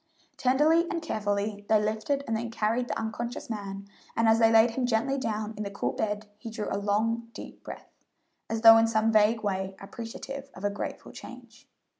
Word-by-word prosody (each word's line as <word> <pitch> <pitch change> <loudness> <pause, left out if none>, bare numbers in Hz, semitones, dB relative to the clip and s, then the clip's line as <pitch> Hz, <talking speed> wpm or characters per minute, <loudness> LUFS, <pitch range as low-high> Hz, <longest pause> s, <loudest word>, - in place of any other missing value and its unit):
Tenderly 305 +6 +3
and 335 - -1
carefully 205 -7 -2
they 215 -1 +5
lifted 220 +7 -1
and 225 - -1
then 230 +1 -3
carried 230 +2 0
the - - -3
unconscious 230 +2 -4
man, 200 -2 -6 0.3
and 230 0 +2
as 225 0 +5
they 225 -1 +5
laid 225 +1 +6
him 245 +1 -1
gently 250 +4 +1
down 215 -2 -3
in - - -4
the 200 - -4
cool 200 - -2
bed 210 0 -3
he 225 - -7
drew 215 -1 -4
a - - -1
long, 225 +3 0
deep - - -10
breath, - - -10 0.6
as 225 0 -2
though 225 0 +10
in 225 0 +4
some 225 0 +2
vague 215 +1 +3
way 190 -1 -2
appreciative 265 +6 -8
of 185 - -11
a 205 - +1
grateful 205 - -6
change. 250 +2 -12
225 Hz, 195 wpm, -28 LUFS, 210-235 Hz, 0.6 s, though